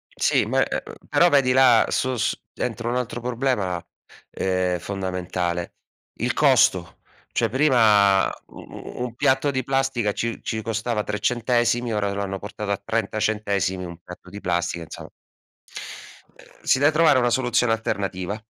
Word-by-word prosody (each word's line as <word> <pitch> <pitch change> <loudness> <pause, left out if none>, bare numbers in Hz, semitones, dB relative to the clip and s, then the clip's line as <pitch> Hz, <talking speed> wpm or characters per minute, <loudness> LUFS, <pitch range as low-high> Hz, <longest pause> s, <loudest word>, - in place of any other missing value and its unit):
Sì, - - +2
ma, - - +2
e - - -3
uhm, - - -10 0.2
però 175 - +5
vedi 135 -4 +3
là 125 -3 +5
su 130 -1 0
su 115 - 0 0.2
dentro 120 0 -3
un 125 - -1
altro 125 -1 -3
problema, 120 -8 -1 0.5
ehm, 90 -1 -1
fondamentale, 90 -2 -3 0.4
il - - 0
costo. - - +3 0.4
Cioè 115 -2 0
prima, 110 -8 +4 0.2
u - - -16
u 125 - -8
un 120 -1 -5
piatto 135 +3 +2
di 130 -2 -2
plastica 135 -5 0
ci 115 0 -3
ci 110 0 -3
costava 110 0 -2
3 105 0 -3
centesimi, 120 -1 +1
ora 100 -1 0
lo 100 - -3
hanno 95 -1 -4
portato 105 0 -5
a 100 - -2
30 110 0 -2
centesimi 100 -4 -1
un 85 -1 -8
piatto 90 +1 -12
di 105 - -8
plastica, 85 -1 -1
insomma. - - -10 1.3
Ehm, - - -16
si - - +3
de 145 +2 +4
trovare 155 -3 +4
una 120 0 +2
soluzione 120 -2 +2
alternativa. 100 -2 -3
110 Hz, 160 wpm, -23 LUFS, 95-125 Hz, 1.3 s, però